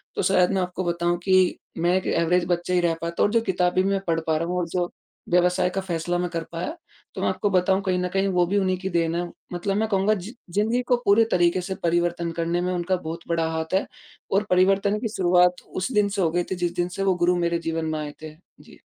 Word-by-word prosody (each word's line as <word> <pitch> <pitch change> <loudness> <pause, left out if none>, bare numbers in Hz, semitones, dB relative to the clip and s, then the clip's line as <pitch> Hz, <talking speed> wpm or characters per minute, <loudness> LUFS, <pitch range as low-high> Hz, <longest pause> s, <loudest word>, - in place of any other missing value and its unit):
तो - - 0
शायद 185 -1 +3
मैं 195 -1 +1
आपको 180 +1 -3
बताऊँ 175 0 0
कि 185 -1 +3 0.2
मैं 175 +2 +2
एक 190 - -3
एवरेज़ 170 +1 +2
बच्चे 175 0 -1
ही 180 - +4
रह 170 -1 +2
पाता 170 0 -1
और 205 - +2
जो 230 +1 +3
किताबें 185 -3 +1
में 195 0 +1
पढ़ 165 -1 +1
पा 160 -1 +2
रहा 165 +2 -2
हूँ 180 - -2
और 175 - -2
जो 175 0 -1 0.4
व्यवसाय 180 +1 +3
का 195 - 0
फ़ैसला 175 -1 -2
में 180 0 -1
कर 165 -1 -3
पाया, 175 - -4 0.4
तो - - -4
मैं - - +1
आपको 205 - -1
बताऊँ 190 +1 +2
कहीं 185 -2 0
न 180 - -1
कहीं 195 0 +1
वो 180 -2 +2
भी 200 - 0
उन्हीं 185 -2 +1
की 190 +1 -4
देन 170 -2 0
है, 175 - 0 0.3
मतलब 195 +3 -2
मैं 220 +1 +1
कहूँगा 200 +1 +2
जि 205 +3 -6 0.2
ज़िंदगी 220 +6 +1
को 250 - +4
पूरे 205 +3 +5
तरीके 175 0 +3
से 190 +2 -4
परिवर्तन 170 0 0
करने 170 +1 0
में 180 0 -1
उनका 180 +1 0
बहुत 165 -1 -5
बड़ा 165 -1 0
हाथ 160 +1 -4
है। 190 - +2 0.5
और 195 +2 +3
परिवर्तन 195 +3 +3
की 230 - -2
शुरुआत, 180 0 +3
उस 185 +8 -4
दिन 210 -3 +2
से 200 -1 -2
हो 165 - +3
गई 175 +1 0
थी - - 0
जिस 175 -1 -2
दिन 175 0 0
से 195 - -1
वो 190 -1 +2
गुरु 175 0 +2
मेरे 170 0 0
जीवन 165 -1 -2
में 155 -1 -2
आए 150 -1 -5
थे। 155 - -7 0.3
जी। - - -17
180 Hz, 255 wpm, -24 LUFS, 170-190 Hz, 0.5 s, पूरे